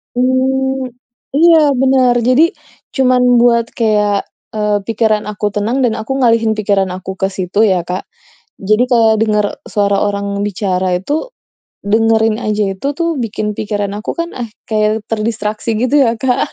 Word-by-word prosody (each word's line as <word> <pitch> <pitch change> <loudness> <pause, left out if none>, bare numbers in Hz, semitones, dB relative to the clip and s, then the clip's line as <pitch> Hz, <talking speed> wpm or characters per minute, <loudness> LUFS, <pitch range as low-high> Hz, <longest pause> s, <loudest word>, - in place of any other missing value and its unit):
Mmm, 265 +1 0 0.5
iya, 330 +2 +6 0.2
bener. 260 -2 +3
Jadi, 255 +5 +5 0.5
cuman 255 -2 +3 0.2
buat 235 -1 +3
kayak, 210 -3 +1 0.3
eee, 210 -1 +1
pikiran 220 -1 +1
aku 210 0 -4
tenang 225 +7 -1
dan 240 -3 +2
aku 245 +5 -3
ngalihin 230 -2 +3
pikiran 200 -2 +1
aku 190 +1 -7
ke 190 - +1
situ 190 0 -3
ya, 185 -3 +1
Kak. 180 +3 -5 0.5
Jadi 215 +4 +2
kalau 225 -2 +4
denger 210 -2 +2 0.2
suara 200 -1 +1
orang 200 0 -2 0.2
bicara 185 -2 -1
itu, 300 - -3 0.6
dengerinnya 220 +1 +1
aja 210 0 0
itu 190 - -5
tuh, 335 0 0
bikin 210 -1 -3
pikiran 205 -1 -2
aku 215 - -4
kan 335 0 -2
ah 245 - -4 0.2
kayak 215 0 +1
terdistraksi 220 0 -2
gitu 255 +3 +1
ya, 230 - +1
Kak. 255 -2 0
220 Hz, 150 wpm, -15 LUFS, 205-250 Hz, 0.6 s, iya